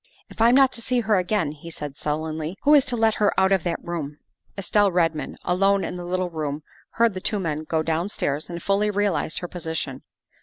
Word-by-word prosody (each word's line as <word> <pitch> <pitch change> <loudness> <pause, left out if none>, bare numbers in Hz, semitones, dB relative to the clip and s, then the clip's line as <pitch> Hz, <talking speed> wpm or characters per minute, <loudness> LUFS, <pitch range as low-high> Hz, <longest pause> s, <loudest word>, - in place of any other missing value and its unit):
"If - - -7
I'm 235 +2 +6
not 270 -1 +6
to 230 - -6
see 250 +1 +1
her 220 -3 +2
again," 180 -4 0
he 155 +2 -10
said 150 -4 -6
sullenly, 155 +3 -3
" - - -58
who 295 - +5
is 285 -2 +6
to 250 -3 0
let 225 -1 +3
her 205 - +3
out 190 0 +3
of 190 -4 +3
that 170 -1 -1
room?" 150 -4 -4 0.4
Estelle 200 +1 +2
Redmond, 165 -3 0
alone 195 +2 +2
in - - -4
the 175 -1 -6
little 180 0 -1
room, 150 -2 -3 0.3
heard 230 -2 +3
the 185 - -5
two 210 - 0
men 155 -5 -3
go 160 0 0
downstairs 160 -3 -2
and 170 -1 -6
fully 200 +1 +2
realized 200 -6 0
her 175 - -4
position. 160 -6 -4
180 Hz, 220 wpm, -24 LUFS, 160-205 Hz, 0.4 s, I'm